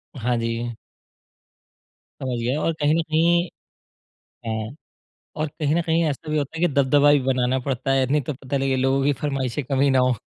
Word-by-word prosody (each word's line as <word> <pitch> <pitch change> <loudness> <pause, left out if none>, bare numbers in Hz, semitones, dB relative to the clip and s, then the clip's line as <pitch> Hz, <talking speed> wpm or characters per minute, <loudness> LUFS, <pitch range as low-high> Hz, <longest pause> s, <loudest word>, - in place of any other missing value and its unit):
हाँ 120 -1 -1
जी। 115 0 -3 1.5
समझ 130 -2 -2
गए 125 +4 0
और 165 +1 0
कहीं 150 +1 +3
न 165 - +2
कहीं 170 +2 +2 1.0
हाँ, 110 +3 -3 0.6
और 155 +1 -1
कहीं 150 0 +1
न 170 - +2
कहीं 165 +1 +2
ऐसा 150 +2 -6
भी 155 - +1
होता 145 +2 -3
है - - -4
कि 175 - +3
दबदबा 140 +1 +4
भी 145 - +4
बनाना 130 0 +1
पड़ता 135 0 -2
है, 135 -1 +2
नहीं 145 +3 +2
तो 140 +2 -4
पता 135 +1 -4
लगे 135 -1 +1
लोगों 135 +1 +1
की 145 - +3
फ़रमाइशें 135 -2 -2
कम 135 +1 -1
ही 140 0 +4
ना 130 - +3
हों। 125 -1 +3
135 Hz, 200 wpm, -23 LUFS, 130-150 Hz, 1.5 s, दबदबा